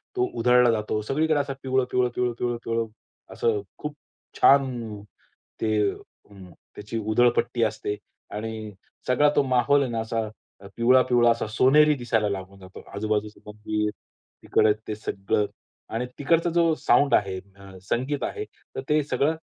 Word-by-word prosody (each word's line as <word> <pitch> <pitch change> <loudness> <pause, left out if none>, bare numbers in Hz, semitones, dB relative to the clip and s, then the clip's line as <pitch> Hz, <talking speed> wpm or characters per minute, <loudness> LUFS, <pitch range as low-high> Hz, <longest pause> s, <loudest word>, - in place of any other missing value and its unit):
तो 375 0 +2
उधळला 125 -1 +5
जातो. 110 -1 -1
सगळीकडे 150 +6 +1
असा 140 -1 -2
पिवळं-पिवळं, 125 -1 +1
पिवळं-पिवळं, 120 -1 -1
पिवळं 115 0 -1 0.5
असं 110 -3 0 0.2
खूप 150 0 -6 0.5
छान, 120 -6 +3 0.6
ते 110 - +1 1.1
त्याची 105 +2 -6
अं, 110 - -3
उधळपट्टी 120 +1 +2
असते 110 -1 -2 0.4
आणि 110 0 -5 0.4
सगळा 145 +4 +4
तो - - +4
माहौल 130 +2 +3
आहे 130 - -3
ना, 115 - -2
असा 110 0 -2 0.5
पिवळा-पिवळा 120 0 +4
असा 115 -1 -1
सोनेरी 140 +7 +5
दिसायला 115 -5 0
लागून 95 0 -6
जातो. 95 0 -12
आजूबाजूचे 105 +1 -2
मंदिर, 105 0 -2 0.5
तिकडे 105 - +3
ते 110 - -3
सगळं 105 -1 -1 0.5
आणि 120 +2 -1
तिकडचा 165 +4 +2
जो 165 -1 +4
साउंड 145 - +3
आहे, 95 -1 0 0.2
अ, 100 -1 -13
संगीत 140 +4 -1
आहे, 425 - -3 0.3
तर - - -3
ते 150 0 +4
सगळं 145 +2 0
120 Hz, 140 wpm, -25 LUFS, 105-135 Hz, 1.1 s, उधळला